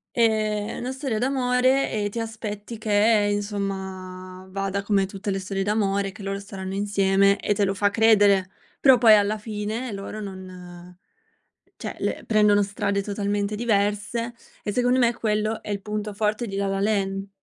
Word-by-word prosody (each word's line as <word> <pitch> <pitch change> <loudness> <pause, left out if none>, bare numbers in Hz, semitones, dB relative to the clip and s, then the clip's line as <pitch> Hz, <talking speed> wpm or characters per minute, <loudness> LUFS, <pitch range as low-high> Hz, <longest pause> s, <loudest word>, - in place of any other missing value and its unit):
ehm, 215 -2 +1
è - - -5
una 250 +2 -4
storia 260 -5 -3
d'amore 255 +1 +2
e 205 -1 -1
ti 230 - -5
aspetti 220 0 -5
che, 210 0 +3
insomma, 190 -2 -5
vada 195 +1 -2
come 200 -2 +2
tutte 195 +1 -5
le 195 - -1
storie 195 0 -3
d'amore, 200 -1 0
che 200 - -13
loro 195 0 -3
staranno 195 -1 -7
insieme 200 0 +2
e 205 - 0
te 205 - 0
lo 195 0 +1
fa 205 +1 +2
credere, 200 -3 +4 0.3
però 265 -2 +7
poi 225 -3 +7
alla 210 +1 +2
fine 215 +2 -4
loro 200 +2 -6
non, 180 -2 -10 0.8
cioè - - -6
le - - -2
prendono 210 -2 +4
strade 200 0 -1
totalmente 205 0 -2
diverse 210 +2 0 0.3
e 205 - -2
secondo 250 +3 +2
me 235 -1 +3
quello 215 -1 -1
è 210 - -7
il 200 -1 -2
punto 210 0 -4
forte 215 +2 -1
di 195 - -5
La 200 - 0
La 195 0 -1
Land. 195 -1 0
205 Hz, 170 wpm, -24 LUFS, 195-220 Hz, 0.8 s, però